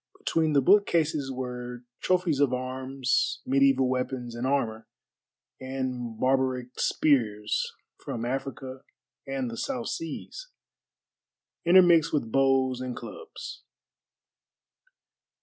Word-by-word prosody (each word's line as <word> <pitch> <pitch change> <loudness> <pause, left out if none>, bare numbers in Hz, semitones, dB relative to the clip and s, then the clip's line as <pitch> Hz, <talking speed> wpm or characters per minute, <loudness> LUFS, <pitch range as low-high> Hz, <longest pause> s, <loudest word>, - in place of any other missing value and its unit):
Between 160 -2 +1
the 140 -2 +4
bookcases 160 -7 +3
were 125 -1 -5 0.2
trophies 180 -5 +1
of 135 -3 +3
arms, 130 +1 -1
mediæval 135 -1 +4
weapons 125 -1 -2
and 120 +2 -2
armor, 115 -5 -1 0.7
and 130 -3 -4
barbaric 130 -1 +1
spears 110 -8 +1 0.2
from 115 0 -4
Africa 135 0 -4 0.5
and 135 -3 -2
the 115 - -7
South 250 - -3
Seas, 165 - -6 1.2
intermixed 170 -2 +6
with 125 -7 -1
bows 135 -1 +2
and 125 -1 -4
clubs. 435 -3 -9
130 Hz, 95 wpm, -27 LUFS, 125-150 Hz, 1.2 s, intermixed